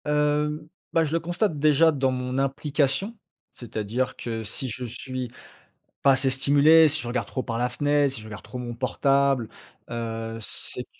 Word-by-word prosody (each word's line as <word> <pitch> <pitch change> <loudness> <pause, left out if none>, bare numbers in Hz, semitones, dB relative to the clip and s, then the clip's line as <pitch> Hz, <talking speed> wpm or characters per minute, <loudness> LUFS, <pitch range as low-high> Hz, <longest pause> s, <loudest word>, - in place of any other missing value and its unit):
Hem, 150 +1 +1 0.3
bah, 165 - +4
je 155 0 -2
le 165 - +2
constate 175 0 -1
déjà 155 +2 +5
dans 135 -3 +1
mon 125 0 -3
implication, 140 - 0 0.4
c'est-à-dire 120 +1 -3
que 115 -2 -4
si 130 +4 -4
je 125 +3 -5
suis 125 +1 -5 0.7
pas 135 - +6
assez 135 0 +3
stimulé, 145 +4 +6
si 155 +1 -1
je - - -6
regarde 120 -3 -2
trop 130 - -3
par 115 -2 -3
la 125 +1 0
fenêtre, 145 +1 +1
si 115 - -8
je - - -12
regarde 105 -2 -9
trop 125 - -8
mon 120 -1 -5
portable, 135 -1 +2 0.4
heu, 115 -1 -4
c'est, - - -6
135 Hz, 175 wpm, -25 LUFS, 120-150 Hz, 0.7 s, pas